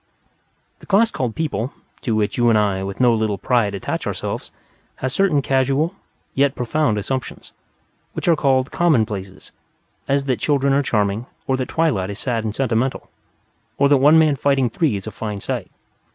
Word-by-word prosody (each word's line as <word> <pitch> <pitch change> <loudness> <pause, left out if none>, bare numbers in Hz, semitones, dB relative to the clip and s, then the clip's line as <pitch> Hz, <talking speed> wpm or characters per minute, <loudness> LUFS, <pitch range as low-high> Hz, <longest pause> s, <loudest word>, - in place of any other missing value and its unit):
The - - -16
class 220 +3 +3
called 120 -4 -3
People 145 -5 -2 0.3
(to 115 -4 -1
which 105 -1 0
you 120 -1 +3
and 110 - +4
I, 100 -3 +1
with 95 0 -5
no 125 -2 +5
little 110 -2 0
pride, 110 -5 +1
attach 95 - -4
ourselves) - - -4 0.5
has 130 0 -3
certain 155 -5 +2
casual, 135 +5 +1 0.4
yet 140 0 +2
profound, 125 -1 0
assumptions, 130 +5 -4 0.6
which - - -4
are 170 - +5
called 135 -3 +1
"commonplaces," 110 - 0 0.6
as 140 0 +1
that 130 -3 0
children 140 -2 +2
are 140 - +3
charming, 105 -2 0 0.2
or 130 - +1
that 130 -1 -3
twilight 130 - 0
is 100 - -5
sad 115 -3 -2
and 105 -1 -3
sentimental, 130 0 -1 0.7
or 140 0 +4
that 145 - +6
one 145 +4 +6
man 155 -3 +4
fighting 135 -3 +1
three 150 -3 +1
is 95 - -5
a 110 - -5
fine 105 0 -5
sight. - - -4
130 Hz, 175 wpm, -21 LUFS, 110-140 Hz, 0.7 s, that